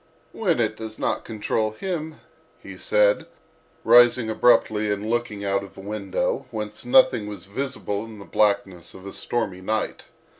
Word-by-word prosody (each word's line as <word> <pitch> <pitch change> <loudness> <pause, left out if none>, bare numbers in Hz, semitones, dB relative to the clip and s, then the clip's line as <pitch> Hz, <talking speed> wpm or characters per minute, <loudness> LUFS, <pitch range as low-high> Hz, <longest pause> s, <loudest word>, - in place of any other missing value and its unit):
"When 180 - 0
it 110 -2 +1
does 110 -1 -7
not - - -1
control 110 0 -2
him," 160 - -4 0.4
he - - -11
said, - - +2 0.6
rising 120 -1 +6
abruptly 110 -2 +3
and 105 +1 -3
looking 115 -3 -2
out 100 0 0
of 100 - -13
a - - -8
window, 100 -1 -2
whence 105 -1 -6
nothing 255 - +4
was 100 -4 -8
visible 105 -2 -3
in 110 -1 -11
the 100 - -11
blackness 100 -4 0
of 95 - -12
a 100 - -7
stormy 105 -6 -3
night. 110 +3 -2
110 Hz, 155 wpm, -24 LUFS, 100-120 Hz, 0.6 s, rising